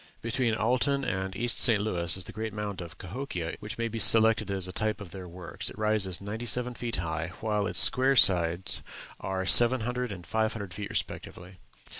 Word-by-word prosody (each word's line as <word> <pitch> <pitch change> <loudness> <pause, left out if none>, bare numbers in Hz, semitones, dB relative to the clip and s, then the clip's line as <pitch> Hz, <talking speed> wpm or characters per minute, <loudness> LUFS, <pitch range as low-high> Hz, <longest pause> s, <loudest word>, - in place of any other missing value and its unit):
Between 115 0 0
Alton 130 +6 +1
and 95 0 -3
East 120 +3 -2
St. 115 -4 +3
Louis 90 -4 -1
is 95 - -2
the - - -9
great 110 -1 -5
mound 105 -3 -5
of 85 0 -10
Cahokia, 90 -4 -5
which 105 - -6
may 115 0 -1
be 115 0 -5
selected 110 0 +5
as 95 -2 0
a - - -6
type 110 +3 -1
of 100 -5 -10
their 95 0 -8
works: 90 0 -6
it - - -12
rises 105 -4 0
ninety 110 +4 -6
seven 125 +1 +1
feet 120 -1 -3
high, 85 +1 -4
while 105 -2 -1
its - - 0
square 130 +2 +5
sides 90 -4 +3 0.4
are 95 0 -3
700 125 +2 +4
and 90 -3 -8
500 110 0 -2
feet 100 +3 -6
respectively. 90 +1 -6
105 Hz, 190 wpm, -28 LUFS, 90-115 Hz, 0.4 s, selected